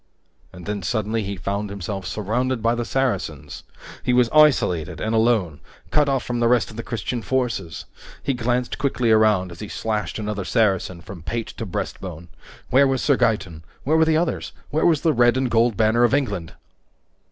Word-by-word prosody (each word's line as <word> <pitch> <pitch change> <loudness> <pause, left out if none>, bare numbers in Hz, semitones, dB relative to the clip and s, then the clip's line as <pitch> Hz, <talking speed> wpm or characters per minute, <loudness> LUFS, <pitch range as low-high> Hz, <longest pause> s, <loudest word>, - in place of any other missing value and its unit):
And 90 -2 -11
then, 105 +1 -3
suddenly, 110 +3 -1
he 100 -1 -4
found 100 +3 -3
himself 95 -1 -5
surrounded 115 +5 -1
by 115 +1 +3
the 120 0 -2
Saracens! 80 - -2 0.4
He 125 - 0
was 125 -2 +3
isolated 130 - +3
and 110 - -2
alone, 110 -9 +2 0.3
cut 150 -2 +3
off 135 -2 0
from 120 -1 -3
the 120 - +3
rest 120 -1 +2
of - - -12
the 115 - -4
Christian 115 +1 -4
forces! 115 -9 -2 0.4
He 140 - 0
glanced 125 0 -1
quickly 125 -4 +1
around 105 -4 +3
as 85 - -11
he 105 - -6
slashed 105 +1 -3
another 105 -2 -3
Saracen 95 -4 0
from 90 0 -10
pate 115 +7 -4
to 115 - -4
breastbone. 90 -3 -5 0.4
Where 140 +2 +5
was 135 -1 0
Sir 140 - +4
Gaeton? 95 -10 0 0.2
Where 155 +4 +2
were 160 0 +5
the 160 -1 +3
others? 170 +1 -2 0.2
Where 155 +3 +2
was 160 -4 +3
the 160 - +2
red 120 0 +4
and 130 -2 0
gold 115 -1 +2
banner 115 +2 +3
of 120 - +3
Richard? 105 - -1
115 Hz, 185 wpm, -22 LUFS, 100-125 Hz, 0.4 s, Where